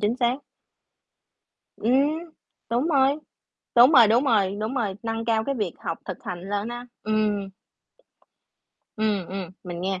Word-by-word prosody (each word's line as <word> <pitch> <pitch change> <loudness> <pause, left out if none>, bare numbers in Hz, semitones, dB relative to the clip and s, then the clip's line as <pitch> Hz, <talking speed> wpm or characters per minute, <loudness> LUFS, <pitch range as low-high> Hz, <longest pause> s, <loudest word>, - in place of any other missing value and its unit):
chính 215 +4 +1
xác. 245 0 +1 1.4
Ừm, 295 +8 +1 0.4
đúng 245 +6 +1
rồi. 275 -1 +3 0.6
Đúng 245 +5 +8
rồi, 245 -6 +8
đúng 235 +5 +4
rồi, 205 -7 +2
đúng 220 +4 -2
rồi, 215 -7 -1
nâng 225 0 -3
cao 220 -1 +1
cái 275 - -1
việc 205 -8 -2
học 165 - -4
thực 185 -3 -6
hành 180 +1 -6
lên 205 +2 -1
ha 240 +1 -6 0.2
ừm. 210 -2 0 1.5
Ừm, 210 -4 0
ừm, 185 -1 -5
mình 175 -1 -6
nghe, 190 0 -2
220 Hz, 150 wpm, -25 LUFS, 195-250 Hz, 1.5 s, Đúng